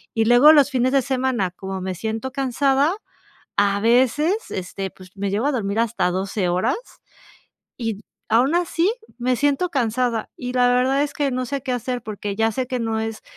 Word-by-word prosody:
Y 225 -1 +2
luego 245 +6 +7
los 290 -2 +5
fines 255 -1 +1
de 275 - +4
semana, 255 -7 0
como 190 +1 -6
me 185 0 -3
siento 220 +7 -4
cansada, 275 +3 +1 0.6
a 200 0 +3
veces, 260 - +2
este, 190 +1 -5
pues, 185 -1 -15
me 200 0 -2
llego 215 +7 0
a - - +2
dormir 210 -3 -1
hasta 225 -5 +1
12 190 - 0 1.0
y 225 -4 -3 0.3
aún 245 +7 +3
así 350 +3 +1 0.2
me 250 +1 +1
siento 290 +7 +1
cansada 240 -5 -1
y 250 0 -5
la 250 -1 +4
verdad 255 +3 +2
es 290 - -4
que 285 -2 -1
no 255 0 -2
sé 275 +1 -4
qué 260 - -3
hacer, 245 0 -3
porque 205 -2 -5
ya 225 +1 +1
sé 255 +3 -3
que 255 0 -2
no 225 -1 -1
es 220 0 -4
245 Hz, 185 wpm, -22 LUFS, 215-265 Hz, 1.0 s, luego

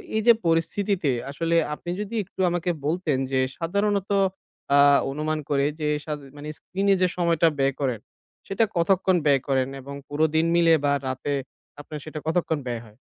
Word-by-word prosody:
এই 220 - +2
যে 235 - +10
পরিস্থিতিতে 170 0 +1 0.2
আসলে 165 +3 -1 0.2
আপনি 175 +3 -7
যদি 210 +3 -5
একটু 190 0 -22
আমাকে 175 0 -1 0.2
বলতেন 155 -3 0
যে 130 - +2 0.2
সাধারণত 200 +3 0 0.7
আ - - +6 0.3
অনুমান 155 +2 -2
করে 140 -1 +2
যে 150 - -1 0.2
সা 155 - -3 0.2
মানে 150 +1 -7
screen-এ 195 +1 0
যে 185 - +5
সময়টা 170 -1 +3
ব্যয় 135 0 +2
করেন 125 -6 -1 0.5
সেটা 195 +4 +1
কতক্ষণ 185 +1 +3
ব্যয় 140 -3 +4
করেন 130 -2 +1
এবং 140 +2 -8
পুরো 150 +2 +1
দিন 160 +1 +3
মিলে 170 -1 +5
বা 140 - +3 0.2
রাতে 130 +2 -2 0.5
আপনে 155 - -10
সেটা 155 0 -6
কতক্ষণ 160 -1 +1
ব্যয় 120 -2 -3
হয়? 105 -1 -18
160 Hz, 170 wpm, -25 LUFS, 140-180 Hz, 0.7 s, যে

